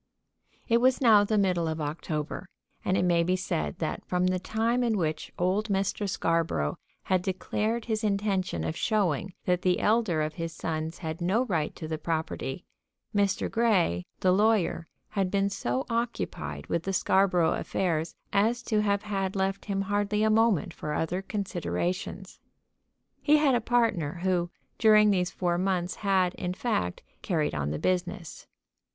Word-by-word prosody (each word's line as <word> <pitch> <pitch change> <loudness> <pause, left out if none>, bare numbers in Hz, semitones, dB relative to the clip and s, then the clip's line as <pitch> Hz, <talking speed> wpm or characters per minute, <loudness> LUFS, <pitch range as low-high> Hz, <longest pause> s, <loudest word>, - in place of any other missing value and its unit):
It 235 0 +3
was 255 +1 +4
now 220 -5 +6
the 215 +1 +1
middle 180 -4 +2
of 160 0 -2
October, 155 +3 -4 0.3
and 185 - +1
it - - +2
may 170 -1 +3
be 180 +2 +1
said 75 - -2
that - - -3
from 180 0 0
the 185 0 +1
time 230 +5 0
in 225 -3 +1
which 155 -3 -2
old 190 +5 0
Mr. 195 +1 0
Scarborough 165 - 0 0.2
had 185 -1 +1
declared 215 +5 -2
his 220 -1 -1
intention 200 - 0
of 80 -1 -2
showing 190 -4 0
that 180 -1 +1
the 180 -1 +2
elder 210 -8 +2
of 155 0 -3
his 165 +1 -5
sons 160 0 -3
had 160 +1 -5
no 200 +9 +2
right 160 -9 -1
to 160 - -6
the 155 -1 -3
property, 160 -2 -3 0.5
Mr. 200 -1 +2
Grey, 195 - +2 0.2
the 185 - +4
lawyer, 200 -5 +2 0.2
had 195 -3 0
been 200 +1 +1
so 125 -7 -2
occupied 230 - -3
with 170 - -1
the 195 +3 -3
Scarborough 185 -3 +3
affairs 165 -3 -1 0.2
as 230 +4 +2
to 215 -2 +1
have 200 -1 +1
had 195 -2 -2
left 195 0 -1
him 195 -2 -1
hardly 205 +1 0
a 220 - +3
moment 215 -5 +2
for 150 -1 -4
other 175 +3 -1
considerations. 185 -2 -3 0.8
He 300 0 +5
had 295 -3 +3
a 240 - +2
partner, 225 -11 +1
who 180 -2 +1 0.3
during 215 -2 +6
these 180 -2 +1
four 175 -1 -1
months 180 -1 -1
had, 190 -3 +2
in 180 -1 -4
fact, 185 - -2 0.2
carried 160 -6 0
on 75 -2 -1
the 75 - -2
business. 180 - -2
185 Hz, 165 wpm, -28 LUFS, 165-210 Hz, 0.8 s, now